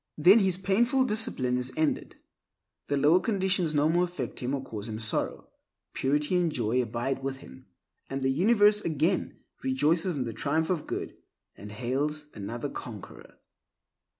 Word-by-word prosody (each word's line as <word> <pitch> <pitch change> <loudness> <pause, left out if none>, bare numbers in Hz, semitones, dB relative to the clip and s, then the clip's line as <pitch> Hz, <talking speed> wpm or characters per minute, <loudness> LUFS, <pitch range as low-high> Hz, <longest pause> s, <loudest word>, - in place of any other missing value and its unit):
Then 185 +8 +7
his 190 -3 +2
painful 235 +8 +2
discipline 140 - +2
is 125 +1 -1
ended; 155 -1 -1 0.7
the 145 - 0
lower 150 +6 +5
conditions 185 -6 0
no 145 +1 +3
more 175 +3 +2
affect 160 -9 -6
him 130 +3 -2
or 135 - -5
cause 110 -4 -7
him 110 - -4
sorrow. 110 -1 -2 0.4
Purity 150 +5 0
and 175 -2 +2
joy 120 -1 0
abide 120 +3 -3
with 135 0 -3
him, 65 - -14 0.4
and 135 0 -3
the 130 - +1
universe 210 - +4
again 165 +3 -1 0.3
rejoices 155 +7 +1
in 135 - -1
the 115 -2 -5
triumph 155 - 0
of 170 -4 -2
good, - - -4 0.4
and 105 +1 -10
hails 140 +7 -2
another 115 +6 -5
conqueror. 115 -6 -10
150 Hz, 155 wpm, -28 LUFS, 125-180 Hz, 0.7 s, Then